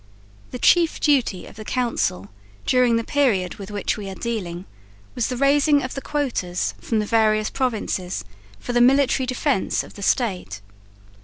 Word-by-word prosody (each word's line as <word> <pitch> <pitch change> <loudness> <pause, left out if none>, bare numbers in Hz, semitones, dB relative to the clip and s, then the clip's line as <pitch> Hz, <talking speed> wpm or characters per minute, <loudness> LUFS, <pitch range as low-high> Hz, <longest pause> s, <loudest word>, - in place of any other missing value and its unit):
The - - -6
chief 335 +5 +3
duty 260 - +1
of - - -14
the 215 - -7
Council, 220 - -1 0.4
during 250 -2 +3
the 230 - 0
period 220 -11 +1
with 195 -2 -8
which 205 +1 -2
we 200 -2 -6
are 190 - -7
dealing, 185 -6 -4 0.5
was 240 - -1
the 250 - -3
raising 285 +2 +3
of 255 - -4
the 275 - -5
"quotas" 255 -13 -2
from 225 - -1
the 210 - +1
various 215 -1 +2
provinces 205 - -2 0.3
for 245 - -5
the 240 - +3
military 265 0 +4
defence 255 -3 0
of - - -13
the 200 - -11
State. 185 - -1
235 Hz, 165 wpm, -22 LUFS, 195-265 Hz, 0.5 s, military